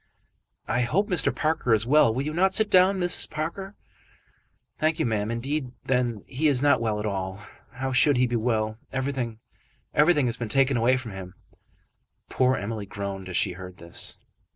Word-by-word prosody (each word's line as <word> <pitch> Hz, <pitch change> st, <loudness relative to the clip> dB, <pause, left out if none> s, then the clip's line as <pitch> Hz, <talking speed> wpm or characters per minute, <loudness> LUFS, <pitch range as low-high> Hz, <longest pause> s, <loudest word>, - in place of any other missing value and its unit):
"I 125 Hz, -, +1 dB
hope 190 Hz, -, 0 dB
Mr. 180 Hz, -, +3 dB
Parker 155 Hz, -7 st, +1 dB
is 110 Hz, +1 st, 0 dB
well. 140 Hz, -2 st, +5 dB
Will 130 Hz, +5 st, -2 dB
you 155 Hz, +1 st, -3 dB
not 190 Hz, +3 st, +2 dB
sit 220 Hz, -1 st, +2 dB
down, 185 Hz, +1 st, +5 dB
Mrs. 175 Hz, -1 st, +1 dB
Parker?" 190 Hz, +6 st, -5 dB, 1.0 s
"Thank 155 Hz, +1 st, +1 dB
you, 160 Hz, -, 0 dB
ma'am. 110 Hz, -2 st, -1 dB
Indeed, 130 Hz, +3 st, -3 dB
then, 125 Hz, -4 st, 0 dB
he 145 Hz, +4 st, -1 dB
is 140 Hz, -4 st, +4 dB
not 140 Hz, -3 st, +3 dB
well 110 Hz, -2 st, -1 dB
at 105 Hz, -, -4 dB
all. 95 Hz, -1 st, -3 dB, 0.3 s
How 130 Hz, +2 st, -3 dB
should 130 Hz, +2 st, +4 dB
he 125 Hz, -, +4 dB
be 120 Hz, 0 st, -2 dB
well? 110 Hz, -2 st, -1 dB
Everything, 130 Hz, -4 st, -3 dB, 0.6 s
everything 150 Hz, -1 st, +4 dB
has 120 Hz, -, -2 dB
been 115 Hz, -3 st, -4 dB
taken 135 Hz, +3 st, +3 dB
away 120 Hz, +2 st, +3 dB
from 125 Hz, -4 st, -7 dB
him." 95 Hz, -2 st, -9 dB, 0.9 s
Poor 130 Hz, 0 st, +2 dB
Emily 105 Hz, -2 st, -4 dB
groaned 100 Hz, -1 st, -6 dB
as 90 Hz, -, -2 dB
she 95 Hz, -, +1 dB
heard 90 Hz, 0 st, -10 dB
this. 85 Hz, 0 st, -3 dB
125 Hz, 180 wpm, -25 LUFS, 110-150 Hz, 1.0 s, well